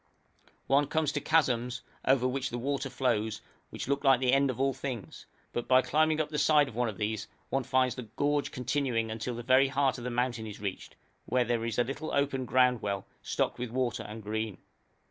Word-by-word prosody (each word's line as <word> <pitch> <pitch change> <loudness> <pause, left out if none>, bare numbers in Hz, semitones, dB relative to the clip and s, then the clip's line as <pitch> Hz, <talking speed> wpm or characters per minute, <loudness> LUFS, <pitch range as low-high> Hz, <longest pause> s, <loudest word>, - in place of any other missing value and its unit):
One 140 +1 +3
comes 155 -2 +1
to 145 -1 -2
chasms, 125 -6 +1 0.2
over 130 -1 +4
which 135 +1 -2
the 120 - -4
water 135 +2 -2
flows, 110 -4 0 0.3
which - - -6
look 140 +1 0
like 135 -3 +5
the 130 -1 +2
end 140 0 +4
of 130 -1 -3
all 135 0 +2
things; 125 -7 -6 0.3
but 120 - -3
by 130 0 +5
climbing 155 +1 +2
up 155 - 0
the 150 -1 -2
side 150 -2 +5
of 115 -4 -1
these 110 0 -2 0.2
one 135 -1 +1
finds 130 -1 +2
the 125 -3 -7
gorge 145 0 +1
continuing 125 -3 -1
until 115 +2 -3
the 120 - -6
very 130 +2 +5
heart 135 -1 +1
of - - -8
the 125 - -2
mountain 120 -2 -1
is 105 - -8
reached, 100 -2 -5 0.3
where 120 -2 +1
is 115 -2 -2
a 120 - +4
little 140 +5 -5
open 140 -2 0
ground 125 -1 +3
well 100 -2 -2 0.2
stocked - - -1
with 125 -1 -3
water 125 -1 -1
and 110 +1 -8
green. 110 -1 -3
125 Hz, 205 wpm, -30 LUFS, 115-135 Hz, 0.3 s, like